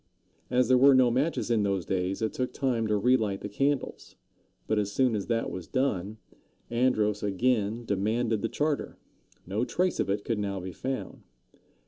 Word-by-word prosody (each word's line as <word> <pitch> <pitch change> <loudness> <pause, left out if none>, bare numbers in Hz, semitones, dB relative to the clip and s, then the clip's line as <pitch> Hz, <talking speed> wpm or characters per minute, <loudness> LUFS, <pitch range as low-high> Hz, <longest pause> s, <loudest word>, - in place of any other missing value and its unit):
As 125 -1 +2
there 130 0 +5
were 135 +1 +7
no 130 -2 +5
matches 130 0 0
in 115 -2 +3
those 100 -3 0
days, 95 +2 -1
it 110 - -1
took 125 -1 -3
time 120 -5 0
to 105 -1 +1
relight 110 -3 +2
the - - -4
candles; 135 +6 -2 0.5
but 110 -1 +1
as 100 -1 -1
soon 125 +1 +2
as 100 - -3
that 115 -1 -1
was 90 -3 -7
done, 110 -6 -1 0.5
Andros 110 -4 +1
again 110 +2 0
demanded 110 +2 0
the - - -1
charter. 150 -1 -2 0.5
No 100 +6 -1
trace 180 +7 0
of - - 0
it 100 +1 -1
could 115 -3 -1
now 100 -1 -2
be 95 +1 -6
found. 130 +7 -5
115 Hz, 175 wpm, -28 LUFS, 100-130 Hz, 0.5 s, were